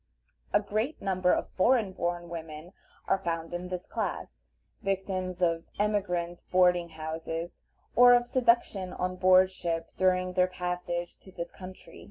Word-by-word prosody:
A 205 - +5
great 215 +8 -2
number 185 -2 +1
of - - 0
foreign 220 0 +3
born 175 -1 -3
women 165 0 -8 0.3
are 195 - +2
found 165 -2 -3
in 175 +1 -4
this 180 -1 -5
class, - - -5 0.4
victims 185 -2 -2
of 165 -1 +1
emigrant 180 -5 -1
boarding 180 -1 +4
houses, 165 +1 -5 0.3
or 245 0 +8
of 240 0 +2
seduction 235 -7 +1
on 185 0 -2
board 185 0 +5
ship 165 -3 -3
during 185 -1 +2
their 180 0 +3
passage 180 -1 -4
to 190 - -15
this 170 -1 -6
country. 185 0 -11
180 Hz, 145 wpm, -29 LUFS, 175-190 Hz, 0.4 s, or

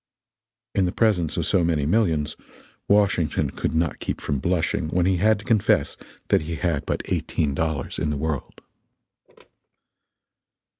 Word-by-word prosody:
In 95 - +2
the 90 - 0
presence 90 -9 +1
of - - 0
so 90 - +2
many 80 -4 +1
millions, 80 -5 +1 0.5
Washington 100 -6 +2
could 80 - -3
not 80 0 0
keep - - -3
from 70 - -2
blushing 90 +3 0
when 85 +2 +1
he 95 -1 +2
had 110 +4 +3
to 105 - -12
confess 110 -4 +2 0.3
that - - +4
he 80 +2 -4
had 85 -4 -1
but - - -1
eighteen 75 -3 -1
dollars 80 -1 -2
in 80 - 0
the 75 - -1
world. 75 -1 -4
85 Hz, 150 wpm, -24 LUFS, 75-95 Hz, 0.5 s, that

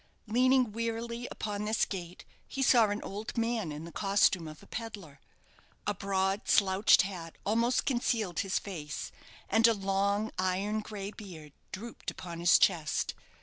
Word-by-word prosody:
Leaning 250 +1 +3
wearily 230 +2 -3
upon 205 -1 -4
this 215 +1 +2
gate, 180 -3 -7 0.2
he 270 - -2
saw 235 -4 +6
an 205 +1 -3
old 210 +5 -6
man 230 -7 0
in 150 +2 -6
the 170 - -9
costume 195 -4 +2
of 155 -1 -10
a - - -13
pedlar. 205 - -7 0.7
A - - +1
broad, 195 +1 -1
slouched 195 +1 +5
hat 175 -4 -7
almost 230 +4 +2
concealed 230 -8 0
his 190 -1 0
face, 155 -7 -5 0.4
and 225 +1 +5
a 230 - +3
long 200 +2 0
iron 190 +3 0
grey 205 -2 -6
beard 165 -9 -11 0.2
drooped 230 +4 -6
upon 170 -2 -7
his 175 +1 +6
chest. 165 -6 +1
200 Hz, 150 wpm, -31 LUFS, 185-225 Hz, 0.7 s, saw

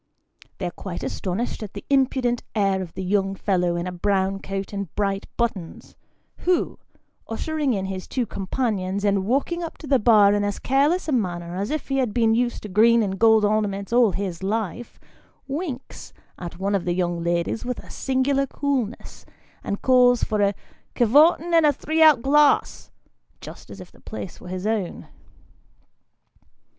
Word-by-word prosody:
They - - -4
are 175 - -2
quite 175 0 -7
astonished 200 +7 -3
at 210 -3 -7
the 200 - -8
impudent 260 -3 +1
air 195 -2 +1
of 175 -3 -8
the 190 - -4
young 195 +1 0
fellow 180 -3 0
in 170 0 -2
a 180 - -3
brown 195 +1 0
coat 195 +1 -5
and 200 -3 -4
bright 195 -1 -1
buttons, 200 -8 -3 0.4
who, 360 0 0 0.5
ushering 295 +3 -1
in 190 -1 -2
his 190 -1 -5
two 250 -2 -1
companions, 200 -2 -2
and 200 -1 +1
walking 280 +8 0
up 335 - -6
to - - -11
the 275 -2 +3
bar 210 -3 +5
in 205 0 +1
as 205 -1 -2
careless 290 +8 +1
a - - -1
manner 175 -8 -2
as 200 +3 -3
if 305 -2 -4
he 270 - 0
had 245 -5 -1
been 225 -2 +3
used 240 +1 -1
to - - -5
green 225 +4 +4
and 190 -2 -3
gold 220 -1 +5
ornaments 205 0 -1
all 240 -4 +5
his 190 -4 -4
life, 220 +3 -3 0.5
winks 275 -2 -6 0.3
at 175 -1 -7
one 195 +2 -1
of 195 -3 0
the 175 - 0
young 175 -2 -1
ladies 170 +5 -1
with 250 0 -5
singular 270 +1 0
coolness, 265 -6 -3 0.4
and 200 - -4
calls 250 -2 +5
for 215 -2 0
a 200 0 +2 0.2
" - - -38
ker 240 - +3
vorten 320 +7 +4
and 330 -1 +5
a 300 - +5
three 315 +3 -2
out 305 -7 +6
glasn," 295 +1 +3 0.5
just - - -11
as - - -10
if - - -11
the - - -21
place 195 -4 -8
were - - -11
his 185 +1 -5
own. 215 -5 -2
215 Hz, 180 wpm, -23 LUFS, 195-260 Hz, 0.5 s, out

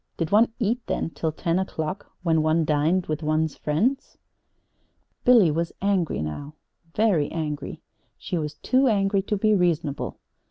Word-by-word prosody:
Did 165 -2 -2
one 225 +3 +5
eat, 235 +1 0
then, - - -2
till 160 -1 -2
ten 170 +3 -1
o'clock, 185 0 -4 0.2
when 165 -2 +2
one 155 +1 +2
dined 155 +5 +1
with 155 0 -3
one's 155 0 0
friends? 215 - -1 1.1
Billy 235 - +6
was 165 +2 -2
angry 185 - 0
now 140 - -6 0.4
very 200 -9 +2
angry. 150 -3 -4 0.3
She - - -5
was 150 -1 -4
too 260 - +2
angry 200 -3 +2
to 205 +2 -2
be 215 +2 +3
reasonable. 170 -7 0
170 Hz, 150 wpm, -24 LUFS, 155-200 Hz, 1.1 s, Billy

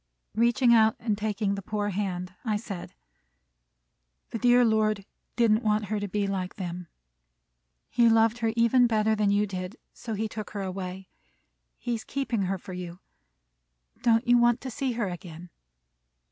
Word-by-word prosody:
Reaching 235 +2 +4
out 220 -1 +5
and 220 -3 0
taking 210 -1 -1
the 200 - -4
poor 205 +1 -2
hand, 185 -2 -3
I 220 -4 0
said, 200 - -7 1.4
"The 230 - -3
dear 245 +1 +5
Lord 215 -2 +1 0.3
didn't 230 -2 +3
want 215 -1 +1
her 210 - 0
to 205 - -3
be 205 +1 -1
like 190 -2 -3
them. 180 -2 -5 1.0
He 235 -1 +4
loved 225 +1 +3
her 225 -1 +1
even 235 +1 +4
better 220 -1 +2
than 210 -1 +1
you 205 +1 +3
did, 185 +1 -5 0.2
so 225 -2 -5
he 220 +2 -1
took 215 0 -7
her 200 - -2
away. 185 0 -5 0.7
He 240 - -3
is 225 -2 -3
keeping 245 -5 -2
her 190 +1 -1
for 185 +1 -10
you. 180 -1 -6 1.0
Don't 230 +1 +3
you 245 0 +6
want 240 0 +4
to 260 - -5
see 260 +1 -2
her 230 -3 -1
again?" 175 -1 -8
215 Hz, 165 wpm, -27 LUFS, 195-230 Hz, 1.4 s, you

